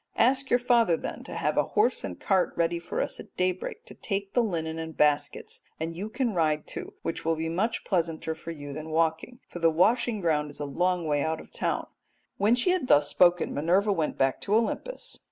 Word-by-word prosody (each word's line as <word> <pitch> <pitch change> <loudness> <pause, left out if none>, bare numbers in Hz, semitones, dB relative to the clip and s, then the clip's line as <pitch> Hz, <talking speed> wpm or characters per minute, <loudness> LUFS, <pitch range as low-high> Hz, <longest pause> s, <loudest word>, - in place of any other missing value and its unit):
Ask 265 +3 +3
your 245 - +5
father, 235 -8 +3
then, - - -6
to - - -7
have - - -1
a - - +5
horse - - +3
and 90 -3 -6
cart 190 -2 +1
ready 170 0 +1
for - - -2
us - - -6
at - - -12
daybreak 185 0 -2
to - - -11
take 200 -1 -4
the 245 - +4
linen 165 -7 -2
and 160 0 -6
baskets, 145 -1 +1 0.2
and 165 +1 -3
you 200 +5 -4
can 240 0 -1
ride 155 -3 +1
too, - - -8
which 165 - -3
will 165 0 +1
be 160 +1 -3
much 215 +8 -1
pleasanter 165 -3 -1
for 160 +1 -10
you 145 -3 -6
than 155 +2 -6
walking, 160 +9 0
for 175 - -8
the 165 -1 +4
washing 215 +7 +2
ground 155 -4 +1
is 145 - -11
a 145 - -2
long 175 +4 0
way 145 -2 +1
out 160 +2 -1
of - - -13
the - - -17
town.' - - 0 0.5
"When 210 +4 +4
she 250 +9 +2
had 365 -8 0
thus 145 - +5
spoken 175 -1 +3
Minerva 185 +8 +2
went 160 -5 -1
back 135 0 +1
to 205 - +1
Olympus. 230 - -2
170 Hz, 225 wpm, -27 LUFS, 160-210 Hz, 0.5 s, your